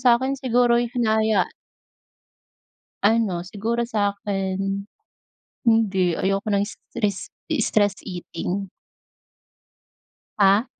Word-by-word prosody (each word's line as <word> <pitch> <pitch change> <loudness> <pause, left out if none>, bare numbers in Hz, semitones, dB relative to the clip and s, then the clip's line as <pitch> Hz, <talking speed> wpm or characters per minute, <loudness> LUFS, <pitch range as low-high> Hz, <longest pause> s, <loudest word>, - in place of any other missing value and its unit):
sa'kin 250 +1 +4
siguro'y 240 -1 +3
hinaya 220 -4 +2 1.6
Ano, 205 -5 +2
siguro 220 +5 -2
sa'kin, 200 -3 -1 0.8
hindi. 195 -6 +3
Ayoko 195 +4 -1
ng 200 -1 +2
stress 205 -1 -3 0.3
stress 205 -2 +2
eating. 180 +1 -4 1.7
Ah? 200 +4 +5
205 Hz, 70 wpm, -23 LUFS, 195-230 Hz, 1.7 s, Ah